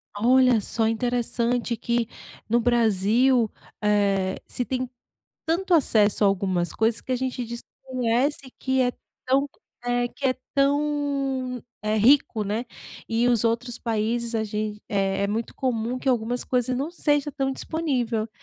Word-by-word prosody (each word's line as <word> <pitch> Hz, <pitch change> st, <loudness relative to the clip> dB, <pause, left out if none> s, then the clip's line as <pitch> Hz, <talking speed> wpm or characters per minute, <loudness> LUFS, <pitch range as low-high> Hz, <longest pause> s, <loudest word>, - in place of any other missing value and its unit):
Olha 250 Hz, +2 st, +4 dB
só, 220 Hz, +2 st, 0 dB
interessante 240 Hz, +1 st, 0 dB
que 235 Hz, 0 st, 0 dB, 0.4 s
no 235 Hz, -, +4 dB
Brasil, 235 Hz, +1 st, +3 dB, 0.3 s
eh, 200 Hz, -2 st, +2 dB
se 245 Hz, -, -2 dB
tem 255 Hz, 0 st, -2 dB, 0.6 s
tanto 350 Hz, +3 st, +1 dB
acesso 215 Hz, -8 st, +3 dB
a -, -, +6 dB
algumas 185 Hz, -3 st, 0 dB
coisas 225 Hz, +1 st, +1 dB
que 260 Hz, -, -4 dB
a -, -, +2 dB
gente 255 Hz, 0 st, -2 dB
desconhece, 255 Hz, +3 st, -2 dB
que 260 Hz, 0 st, +1 dB
é 250 Hz, -1 st, +2 dB, 0.3 s
tão 275 Hz, +2 st, +2 dB, 0.4 s
é, 245 Hz, 0 st, +1 dB
que 275 Hz, +3 st, -3 dB
é 255 Hz, -, +1 dB, 0.2 s
tão 275 Hz, -3 st, 0 dB, 0.2 s
é 215 Hz, 0 st, 0 dB
rico, 225 Hz, -1 st, +4 dB
né. 210 Hz, +4 st, -2 dB, 0.4 s
E, 230 Hz, +1 st, +2 dB
os 235 Hz, -3 st, +3 dB
outros 235 Hz, +1 st, -1 dB
países, 230 Hz, +1 st, -1 dB
a 220 Hz, -1 st, +1 dB
gen 210 Hz, 0 st, -3 dB
é 195 Hz, -1 st, 0 dB
é -, -, +2 dB
muito 220 Hz, +3 st, -3 dB
comum 245 Hz, -1 st, -1 dB
que 270 Hz, -, -3 dB
algumas 245 Hz, 0 st, 0 dB
coisas 250 Hz, 0 st, 0 dB
não 280 Hz, +5 st, -2 dB
seja 295 Hz, -4 st, +1 dB
tão 270 Hz, -1 st, -1 dB
disponível, 250 Hz, -8 st, -1 dB
240 Hz, 145 wpm, -25 LUFS, 220-260 Hz, 0.6 s, a